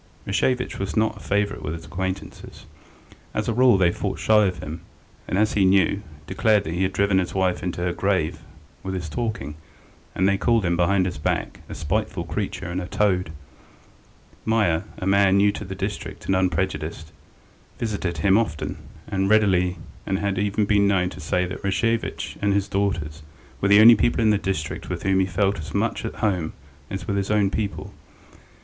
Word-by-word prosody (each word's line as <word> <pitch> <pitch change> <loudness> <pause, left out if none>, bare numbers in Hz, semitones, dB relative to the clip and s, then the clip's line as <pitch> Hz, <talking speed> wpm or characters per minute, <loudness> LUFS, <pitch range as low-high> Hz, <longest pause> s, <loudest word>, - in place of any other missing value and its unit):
Rashevitch 125 +5 0
was 95 -5 -3
not 110 0 +1
a - - -11
favourite 100 0 -1
with 80 - -4
his 80 -1 -10
acquaintances; 95 +2 -6 0.7
as - - -1
a 115 - +1
rule 125 -2 +5
they 90 -2 +3
fought - - -3
shy 105 -2 +4
of 90 -1 -3
him, 80 -1 -7 0.5
and, 95 - -1
as 110 +1 +2
he 100 - +3
knew, 95 +1 +3 0.2
declared 105 +6 +2
that 80 - -4
he 90 - -2
had 95 0 +1
driven 100 0 +2
his 90 - -3
wife 95 -2 +1
into 90 0 -3
her 90 0 0
grave 95 -6 0 0.4
with 95 0 -4
his 90 -3 -4
talking, 80 - -3 0.6
and 95 - +2
they 100 0 +2
called 115 -4 +2
him, 85 0 +1
behind 90 +2 +2
his 90 -5 -4
back, - - -2
a - - -6
spiteful 95 +2 -2
creature 95 +3 -4
and 90 +2 -2
a 90 - -6
toad. 90 -5 +1 1.1
Meier, 105 -8 +1
a - - -5
man 100 0 +4
new 100 +1 +4
to 105 - -6
the 95 -1 -6
district - - -5
and 95 - +1
unprejudiced, 90 -3 -1 0.7
visited 100 -7 -2
him 95 +7 +4
often 80 -10 -3 0.3
and 95 0 0
readily 95 -4 +3 0.3
and 95 - 0
had 100 -1 -1
even 105 +1 +1
been 100 0 +3
known 95 -2 +1
to - - -10
say 90 +4 0
that 95 +3 -7
Rashevitch 115 +4 -1
and 100 0 +2
his 100 0 +1
daughters 95 -6 -2 0.4
were 100 - +2
the 100 +1 +7
only 115 +2 +10
people 115 +2 +2
in 110 -1 +4
the 105 - +2
district 85 -5 -3
with - - -4
whom 95 0 +2
he 95 - +2
felt 95 +1 0
as 80 -1 -7
much - - 0
at - - -5
home 90 -6 -1 0.4
as 100 +2 -5
with 100 -2 0
his 100 -1 -1
own 105 -2 +2
people. 105 -2 -3
95 Hz, 195 wpm, -23 LUFS, 90-100 Hz, 1.1 s, only